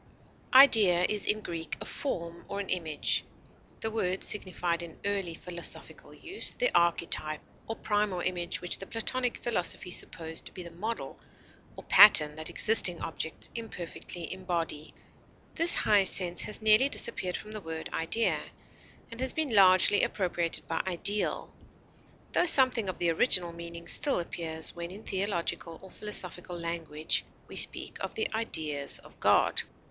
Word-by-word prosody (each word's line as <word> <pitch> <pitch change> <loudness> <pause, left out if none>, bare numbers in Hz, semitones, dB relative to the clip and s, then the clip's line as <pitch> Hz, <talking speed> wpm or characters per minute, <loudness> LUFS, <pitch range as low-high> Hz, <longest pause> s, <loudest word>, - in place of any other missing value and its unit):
Idea 210 -10 +6
is 210 -1 -2
in 215 +1 0
Greek 165 -4 -6
a - - -8
form 170 -10 -6
or 200 - -5
an 200 - -6
image. 160 -5 -1 0.6
The 220 - -3
word 190 -4 -2
signified 180 -4 +1
in 170 -2 -10
early 195 -4 -3
philosophical 170 0 -6
use 370 +4 -1
the - - -1
archetype 165 -2 +1 0.3
or 225 - -5
primal 205 -4 -2
image 175 -1 -2
which 175 - -1
the 195 - -8
Platonic 245 +2 -2
philosophy 190 -4 -2
supposed 160 -2 -3
to - - -12
be 180 - -8
the 170 - -11
model 215 +7 -6 0.6
or - - -11
pattern 160 -7 +7
that 155 - -2
existing 190 -6 +3
objects 160 0 -3
imperfectly 175 -6 -6
embody. 170 -5 -5 0.6
This 335 +1 +8
high 205 -2 +3
sense 180 -2 +3
has 210 +1 -2
nearly 220 +6 +5
disappeared 185 -9 -3
from 215 - -11
the 215 -1 -7
word 160 -2 -7
idea, 220 +8 0 0.7
and 230 - -10
has 260 - +1
been 310 -6 -2
largely 190 0 +5
appropriated 175 -3 -1
by 165 - -2
ideal, 200 +3 0 0.8
tho 355 - +1
something 255 - +5
of 185 - -6
the 170 -1 0
original 175 -1 +1
meaning 170 0 -10
still 280 +3 +2
appears 160 -2 -3
when 170 0 -7
in 200 +4 -11
theological 185 -3 -4
or 190 - -12
philosophical 180 -4 -2
language 165 -2 -2 0.2
we - - -12
speak - - +1
of - - -6
the 440 - -3
ideas 155 -10 -2
of - - -17
God. - - +3
180 Hz, 150 wpm, -28 LUFS, 170-215 Hz, 0.8 s, This